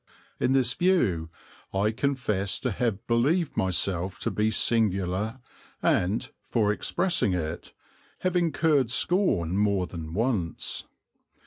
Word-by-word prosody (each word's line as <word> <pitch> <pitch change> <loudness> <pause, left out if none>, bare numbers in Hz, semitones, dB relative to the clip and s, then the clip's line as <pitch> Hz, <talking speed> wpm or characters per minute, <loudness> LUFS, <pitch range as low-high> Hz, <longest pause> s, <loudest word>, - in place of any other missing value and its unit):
In 130 - +2
this 130 -2 +3
view 105 - +1 0.4
I 100 +2 +1
confess 110 -6 -1
to 125 - -1
have 110 -1 -2
believed 140 +9 +1
myself 95 +1 0
to - - -1
be 105 +1 +1
singular 105 0 0 0.4
and, 95 +6 +1 0.2
for 105 -3 +2
expressing 105 - +1
it, 80 -1 -4 0.5
have 185 -1 0
incurred 160 -6 +2
scorn 120 - +2
more 100 -3 +2
than 80 -2 -7
once. 105 -7 -1
110 Hz, 115 wpm, -27 LUFS, 95-130 Hz, 0.5 s, this